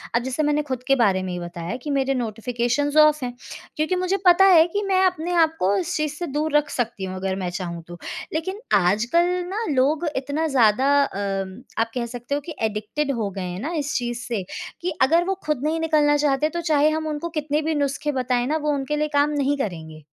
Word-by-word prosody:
अब 235 - +3
जैसे 260 +4 -1
मैंने 295 0 +2
खुद 260 -4 -4
के 275 - +5
बारे 200 -7 +2
में 185 - -4
ही 180 - -4
बताया 175 +3 -5
कि 300 - -5
मेरे 275 -1 +1
नोटिफ़िकेशंस 245 +4 -1
ऑफ 305 -1 +6
हैं 245 - -3 0.4
क्योंकि 310 +4 +1
मुझे 365 +1 0
पता 360 +2 +7
है 345 -4 +7
कि 405 +4 -2
मैं 375 -1 +3
अपने 355 -1 0
आप 325 -2 +3
को 195 +2 +2
इस 355 +1 -2
चीज़ 305 -1 -1
से 345 +3 -5
दूर 295 +1 -1
रख 295 0 0
सकती 235 -7 -3
हूँ 185 0 -5
अगर 190 0 -2
मैं 185 -2 -3
चाहूँ 175 -2 -5
तो। 175 0 -9 0.4
लेकिन 375 +6 -3 0.2
आजकल 215 - +3 0.2
ना 430 +4 -2
लोग 285 +5 +2
इतना 285 +4 -1
ज़्यादा 260 0 +3
अम, 195 -2 -3 0.2
आप 225 0 0
कह 245 -2 -1
सकते 245 +4 -4
हो 290 - -2
कि 325 - -7
एडिक्टेड 220 +7 -2
हो 205 - -1
गए 195 0 -6
हैं 180 0 -4
ना 320 +5 -3
इस 290 -1 -2
चीज़ 240 -1 -3
से 225 -6 -2 0.4
कि 355 +1 -1
अगर 330 +6 +4
वो 385 - 0
खुद 300 -4 -1
नहीं 315 +2 0
निकलना 305 -2 +3
चाहते, 290 +1 +1
तो 340 +2 -3
चाहे 305 -2 +3
हम 315 0 -2
उनको 305 +2 -3
कितने 300 +1 -1
भी 315 +1 -1
नुस्खे 290 +1 -1
बताए 250 -2 0
ना, 305 +4 0
वो 300 -1 -1
उनके 280 +1 -2
लिए 305 - +1
काम 285 +1 +3
नहीं 290 -1 0
करेंगे। 160 - -5
285 Hz, 225 wpm, -23 LUFS, 230-310 Hz, 0.4 s, पता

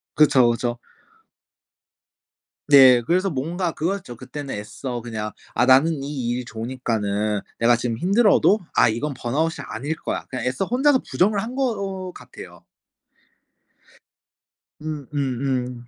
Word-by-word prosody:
그쵸, 135 -5 +5
그쵸. 120 0 -3 1.9
네. 130 -4 +8
그래서 185 +9 +1
뭔가 165 +6 -2
그거였죠. 170 -7 -3
그때는 135 +3 -7
애써 120 +4 -6
그냥 110 -2 -5 0.2
'아 120 - +3
나는 135 +3 +4
이 135 -4 -3
일이 125 0 -2
좋으니까는 110 -4 -2 0.2
내가 120 +1 +4
지금 115 -1 -3
힘들어도 205 - +4 0.2
아 - - +5
이건 140 +6 -2
번아웃이 145 +4 -2
아닐 145 +8 -4
거야.' - - -4
그냥 130 -2 -4
애써 130 +8 -1
혼자서 260 +4 +3
부정을 200 +2 +2
한 230 - -5
것 195 -8 -2
같아요. - - -13 2.2
음 155 -3 -5
음 135 -3 -2
음. 125 -2 -3
135 Hz, 260 characters per minute, -22 LUFS, 120-170 Hz, 2.2 s, 네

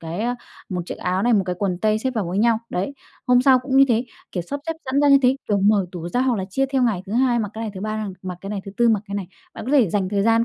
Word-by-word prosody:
cái, 165 +4 -5
à, 245 +2 -1 0.3
một 180 -2 -3
chiếc - - -6
áo 185 +1 -1
này, 240 - +3
một 205 -3 +4
cái 180 - -1
quần 185 -3 -1
tây 215 +2 +1
xếp 260 +3 -1
vào 215 -5 0
với 185 +3 -2
nhau. 225 +1 +3
Đấy. 195 +10 -2 0.3
Hôm 250 0 +5
sau 260 -1 +6
cũng 260 +1 -2
như 275 - +8
thế, 235 0 +2 0.3
kiểu, 180 - -2
sắp 280 +11 -5
xếp 325 - 0
sẵn 265 +2 +1
ra 290 - +4
như 275 0 +7
thế, 255 +1 +4
kiểu, 205 - +2
mở 200 -2 +3
tủ 175 -2 -5
ra 245 - 0
hoặc 255 -3 +2
là 190 - -2
chia 270 +7 +1
theo 265 -1 0
ngày 215 -7 +1
thứ 200 - -6
Hai 245 0 +2
mặc 210 -3 -2
cái 225 - -5
này, 220 - -3
thứ 185 - -7
Ba 215 +1 -3
đang 210 -3 -4
mặc 180 -2 -6
cái 195 - -7
này, 205 -2 -3
thứ 195 - -7
Tư 240 0 +4
mặc 220 -3 +3
cái 200 - -6
này. 200 -2 -3 0.3
Bạn - - -7
có 265 - -2
thể 260 -9 +5
dành 195 -1 0
thời 200 0 0
gian 230 +1 +3
215 Hz, 335 wpm, -22 LUFS, 195-250 Hz, 0.3 s, như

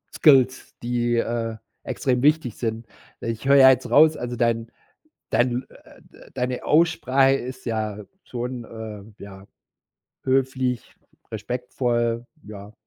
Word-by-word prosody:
Skills, 130 -4 +4
die, 120 0 0
äh, 115 -1 -2 0.3
extrem 125 -2 -1
wichtig 150 -6 +2
sind. 115 -1 -4 0.3
Ich 115 +2 -5
höre 140 - +6
ja 130 -1 +9
jetzt 125 -1 +2
raus 155 +6 +6
also 120 0 -4
dein 115 -1 0 0.6
dein, 125 +1 +1
äh, - - -18
d - - -19
äh, - - -17
deine 125 -1 -3
Aussprache 140 -5 +3
ist 130 -1 -7
ja 110 -3 -3 0.2
schon, 125 0 -5
äh 110 -2 -10
ja, 95 -1 -11 0.8
höflich, 130 -2 -1 0.4
respektvoll, 120 +1 -2 0.2
ja, 105 0 -11
120 Hz, 125 wpm, -23 LUFS, 115-130 Hz, 0.8 s, ja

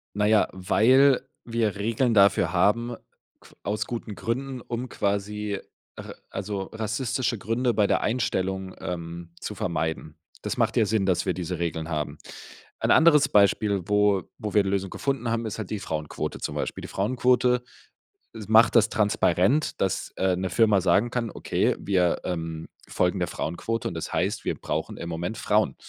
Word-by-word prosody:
Na 105 - +1
ja, 110 0 +4
weil 130 +8 +4 0.2
wir 115 -3 0
Regeln 115 +4 0
dafür 100 -2 +4
haben 115 +6 +2 0.4
qu - - -19
aus 105 +1 -2
guten 115 -3 -5
Gründen, 130 +2 -3
um 120 +2 -5
quasi 100 0 -2 0.4
ra - - -8 0.2
also 100 0 -4
rassistische 115 +2 -1
Gründe 115 +4 0
bei 100 -1 +3
der - - +2
Einstellung, 95 -5 -1
ähm, 85 -1 -6
zu - - -6
vermeiden. 80 -1 -3 0.3
Das - - -3
macht - - +1
ja 110 - +4
Sinn, 105 -1 +1
dass 90 -3 +1
wir 95 - +1
diese 90 -1 -4
Regeln 80 -1 -3
haben. 75 -2 -3 0.6
Ein - - +1
anderes 160 -3 +6
Beispiel, 100 -1 +3
wo 105 -2 +3
wo 105 -2 -5
wir 105 - +5
die 95 - -2
Lösung 95 -1 -1
gefunden 135 -4 -2
haben, 115 0 -1
ist 110 - -4
halt 105 - -5
die 105 - -3
Frauenquote 75 -5 -4
zum - - -4
Beispiel. - - -3
Die - - -6
Frauenquote 125 +3 +2 0.8
macht 110 +3 +5
das 115 -1 +5
transparent, 105 - +2
dass, 95 -2 -1
äh, 95 -1 +2
'ne 95 0 -2
Firma 105 -2 +3
sagen 110 +5 +3
kann: 115 -3 -2
„Okay, - - 0
wir, 90 -3 +1
ähm, 80 -2 -4 0.2
folgen - - 0
der - - 0
Frauenquote, 115 +8 -3
und - - -7
das - - -5
heißt, - - -1
wir - - 0
brauchen - - -4
im 85 - -6
Moment 85 +6 -4
Frauen, 105 -12 +1
105 Hz, 170 wpm, -26 LUFS, 95-115 Hz, 0.8 s, anderes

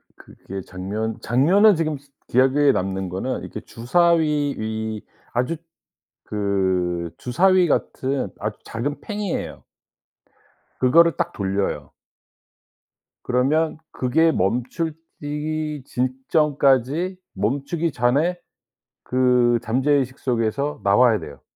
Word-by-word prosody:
그게 95 +1 -9
장면, 105 +5 -4
장면에 185 - +4
지금 155 -3 -1
스 140 +1 -22 0.2
기억에 135 +3 +4
남는 95 0 -2
거는 95 +9 -3
이렇게 - - -7
주사위 150 +2 +1
위 110 0 -3 0.3
아주 125 +7 0 0.7
그 95 -4 -1
주사위 185 +8 +3
같은 135 -2 -1
아주 105 0 -4
작은 140 +6 -4
팽이예요. 210 -4 -4 1.2
그거를 165 +5 +5
딱 - - -1
돌려요. 100 0 -2 1.3
그러면 150 +6 +1
그게 160 +6 +2
멈춰지기 150 - -3
직전까지 135 +5 +1 0.2
멈추기 140 - -1
전에 140 +8 +1 0.7
그 125 -2 +3
잠재의식 130 +2 +1
속에서 125 +4 -1
나와야 110 +3 +4
돼요. 70 - -10
130 Hz, 215 characters per minute, -22 LUFS, 110-155 Hz, 1.3 s, 그거를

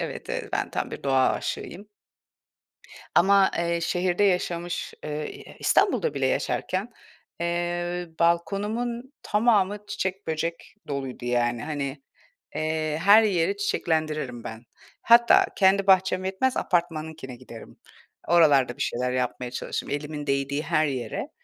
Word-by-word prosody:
Evet, - - -5
eee, - - -4
ben - - -1
tam - - -3
bir - - -7
doğa 135 -1 +3
aşığıyım. 200 +5 -5 1.3
Ama, 195 +1 +5
eee, 170 0 0
şehirde 180 +2 +1
yaşamış, 175 -2 -1
eee, 150 - -4
ı 150 +1 -3 0.3
e - - -17
İstanbul'da 475 - +2
bile - - 0
yaşarken, 195 +6 -1 0.5
eee, 175 +1 -2
balkonumun 210 +9 0
tamamı 210 -2 +2
çiçek, 195 -1 -4
böcek 165 +1 -4
doluydu, 135 -3 -5
yani. 120 -1 0
Hani, 145 -2 -4 0.5
eee, 155 -1 -1
her 205 +3 +8
yeri 195 -2 +1
çiçeklendiririm 155 - -2
ben. 110 +1 -8 0.4
Hatta, 235 0 +6
kendi 195 0 +4
bahçem 190 -1 +3
yetmez, 195 +8 0
apartmanınkine 160 -6 -2
giderim. 120 -2 -12 0.5
Oralarda 145 -7 +4
bir - - -2
şeyler 125 +1 -1
yapmaya 125 -1 -2
çalışırım, 125 - -4
elimin 150 0 -4
değdiği 140 +1 -1
her 155 -1 +1
yere. 135 - -4
170 Hz, 125 wpm, -25 LUFS, 140-190 Hz, 1.3 s, her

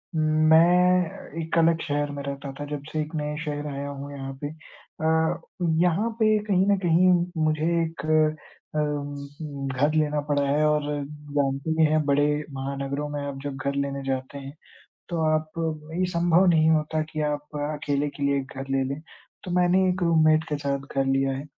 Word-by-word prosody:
मैं 165 +3 +3
एक 160 +1 -2
अलग 165 0 +4
शहर 145 0 -1
में 140 0 -5
रहता 140 0 -5
था, 145 - -4
जब 145 -1 -5
से 155 - -1
एक 155 +2 -6
नए 150 0 -2
शहर 150 -1 -3
आया 140 +1 -4
हूँ, 140 0 -7
यहाँ 135 -1 -6
पे 145 - 0
अ, 160 +1 -2 0.4
यहाँ 180 +6 +2
पे 215 -1 +4
कहीं 195 -2 +2
न 200 - +4
कहीं 175 +2 +5 0.3
मुझे 155 0 +1 0.2
एक 160 -3 -4 0.7
अम 145 -1 -4
घर 145 +4 +2
लेना 150 -1 +1
पड़ा 145 -1 +2
है 150 +2 +2
और 150 0 +2 0.5
जानते 140 +2 0
भी 160 - +4
हैं, 155 0 +2
बड़े 145 0 +3 0.3
महानगरों 140 +2 -3
में 145 -1 -4
आप 140 -1 -5
जब 145 -1 -4
घर 140 - 0
लेने 140 0 -2
जाते 130 +1 -3
हैं, 140 0 -8 0.6
तो 170 -2 -2
आप 155 0 0 0.5
ये 185 - +3
संभव 170 +1 +3
नहीं 160 -2 +4
होता 155 0 +1
कि 155 - -3
आप 150 0 -6 0.2
अकेले 145 -1 -1
के 140 0 -7
लिए 140 0 +2
एक 135 0 -8
घर 135 0 -5
ले 135 0 +2
लें। 145 - -8 0.4
तो 180 - -5
मैंने 180 +1 +3
एक 185 +1 -2
रूममेट 155 -2 +4
के 150 - 0
साथ 140 -1 -1 0.2
घर 135 - +2
लिया 135 0 +1
है। 135 +2 -5
150 Hz, 185 wpm, -25 LUFS, 140-160 Hz, 0.7 s, कहीं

